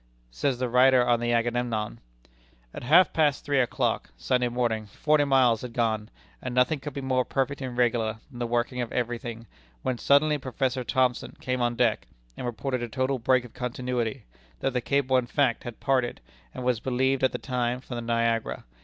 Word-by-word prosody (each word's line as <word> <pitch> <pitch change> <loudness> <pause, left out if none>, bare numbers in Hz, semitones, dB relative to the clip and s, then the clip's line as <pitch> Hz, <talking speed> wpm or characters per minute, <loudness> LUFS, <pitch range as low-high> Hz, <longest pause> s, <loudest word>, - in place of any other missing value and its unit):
Says 125 - -1
the 125 0 -1
writer 125 +1 +5
on 120 -1 +3
the 120 0 0
Agamemnon: 115 - -1 0.7
"At - - -7
half 160 +9 +5
past 150 -3 +2
three 145 -2 +2
o'clock 125 - 0
[Sunday 125 - +1
morning] 120 -3 -1
forty 150 +8 +2
miles 130 -5 +4
had 125 -2 -7
gone, 110 -3 0 0.3
and 125 -1 -4
nothing 125 +4 +3
could 145 0 -7
be 140 - -3
more 130 -1 +1
perfect 135 +2 -2
and 125 -2 -5
regular 115 -3 +1
than 120 - -10
the 120 - -1
working 120 +1 -1
of 120 - -4
every 120 -1 -1
thing, 115 -1 -7 0.4
when 125 -2 -1
suddenly 150 +1 +4
Professor 130 0 -2
Thomson 125 0 0
came 130 -1 -2
on 120 0 +1
deck, 115 -3 +1 0.3
and 125 - -5
reported 125 +2 -2
a 120 - -4
total 130 +3 -1
break 130 +1 +2
of 120 - -13
continuity; 125 -2 -3 0.3
that 135 - -1
the 125 - 0
cable 135 0 +2
in 125 -1 0
fact 130 -2 +1
had 120 -2 -7
parted, 130 -3 0 0.3
and, 125 - -7
as - - -5
was 125 -3 +2
believed 130 +2 0
at 130 - +4
the - - -3
time, 125 -1 -2
from 130 -1 -8
the - - -3
Niagara. 115 -1 0
125 Hz, 200 wpm, -27 LUFS, 120-130 Hz, 0.7 s, writer